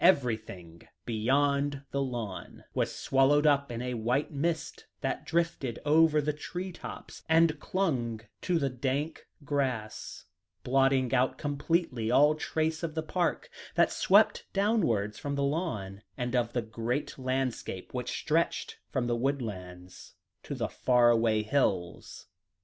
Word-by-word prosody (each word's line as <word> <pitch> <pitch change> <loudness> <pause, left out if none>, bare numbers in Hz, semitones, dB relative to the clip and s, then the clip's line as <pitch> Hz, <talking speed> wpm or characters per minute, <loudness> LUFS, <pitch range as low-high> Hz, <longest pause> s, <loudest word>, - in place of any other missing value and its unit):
Everything 110 - -6 0.2
beyond 140 +5 +1
the 140 - 0
lawn 115 -9 -5
was - - 0
swallowed 140 +3 +3
up 140 -3 +3
in 120 +1 -4
a 125 0 -2
white 120 +7 0
mist 160 +2 -2
that - - -3
drifted 165 -8 -1
over 155 0 +5
the 150 +1 0
tree 180 +5 -5
tops, - - -9
and 160 -1 +4
clung 130 - -1 0.2
to 180 -2 +1
the 140 -4 +1
dank 135 +5 -2 0.2
grass, 130 -7 -2 0.4
blotting 135 0 +2
out 130 0 +2
completely 145 -5 -1
all 145 +5 +5
trace 160 +1 -1
of 165 -2 -4
the 160 - -1
park, 175 +2 -1 0.3
that - - +4
swept 480 0 +4
downwards 165 - +1
from 140 0 -3
the 140 - 0
lawn, 140 - -2 0.2
and 125 -1 -2
of 120 -1 +1
the 120 - 0
great 115 +6 -3
landscape 130 -7 -3
which 125 -1 -3
stretched 165 +2 0
from 130 -3 -1
the 120 0 0
woodlands 95 -9 -4 0.3
to - - -6
the - - -1
far 120 -1 +4
away 115 -2 +2
hills. 100 -8 -1
135 Hz, 140 wpm, -30 LUFS, 115-150 Hz, 0.4 s, over